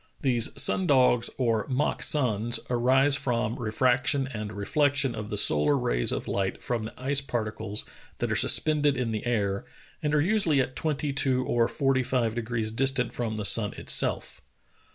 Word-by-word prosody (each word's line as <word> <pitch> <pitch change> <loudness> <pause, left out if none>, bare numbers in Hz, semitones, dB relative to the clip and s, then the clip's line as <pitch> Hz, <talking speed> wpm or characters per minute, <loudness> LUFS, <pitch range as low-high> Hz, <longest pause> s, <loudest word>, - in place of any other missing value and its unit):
These 125 -5 0
sun 185 - +1
dogs, 125 -4 +3
or 115 -4 0
mock 135 +3 -1
suns, 120 -5 +1
arise 130 +4 +3
from 120 -4 -2
refraction 130 +4 +1
and 105 -5 -6
reflection 135 +5 0
of 105 -2 -7
the 105 - -3
solar 75 -6 +4
rays - - +1
of - - -4
light 95 -1 -3
from 120 -3 -2
the 110 +3 -9
ice 140 +2 0
particles 110 -5 -4 0.3
that - - -3
are - - 0
sus - - +6
pended 150 -3 0
in 125 -3 -2
the 110 -1 -4
air, 100 -4 -1 0.4
and 150 0 -1
are - - +3
usually 175 -5 +2
at 130 0 -2
twenty 150 -2 -2
two 130 -1 +1
or 120 -1 +1
forty 135 -1 0
five 120 -3 -1
degrees 115 -2 -3
distant 130 +1 +1
from 115 -2 -3
the 105 -1 -4
sun 105 +1 +3
itself. - - 0
125 Hz, 175 wpm, -26 LUFS, 110-135 Hz, 0.4 s, sus